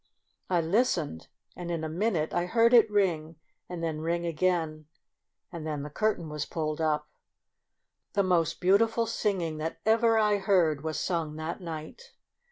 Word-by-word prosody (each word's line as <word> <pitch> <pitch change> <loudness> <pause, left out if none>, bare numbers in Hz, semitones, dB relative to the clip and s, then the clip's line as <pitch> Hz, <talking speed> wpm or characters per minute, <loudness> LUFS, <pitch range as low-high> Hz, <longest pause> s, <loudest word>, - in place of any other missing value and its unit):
I 175 -2 +2
listened, 165 - 0 0.3
and 175 -1 -6
in 165 -2 -2
a - - -1
min 190 +7 0
ute 155 -1 -1
I 175 0 0
heard 230 +4 +4
it 230 -2 +7
ring, 170 -6 0 0.3
and 175 -2 -5
then 155 -2 -2
ring 170 +1 -1
again, 160 -2 -1 0.6
and 165 -3 -6
then 150 -2 -3
the 150 - -7
curtain 210 -2 0
was 150 -1 -4
pulled 155 -1 -3
up. 150 -1 0 1.1
The 200 - +2
most 170 -3 +1
beautiful 225 +5 +3
singing 185 -8 -1
that 160 +1 -3
ever 225 +1 +4
I 210 -1 +3
heard 175 -7 +2
was 160 -1 -2
sung 165 -4 -2
that 160 +4 -5
night. 165 - -8
170 Hz, 165 wpm, -28 LUFS, 155-200 Hz, 1.1 s, it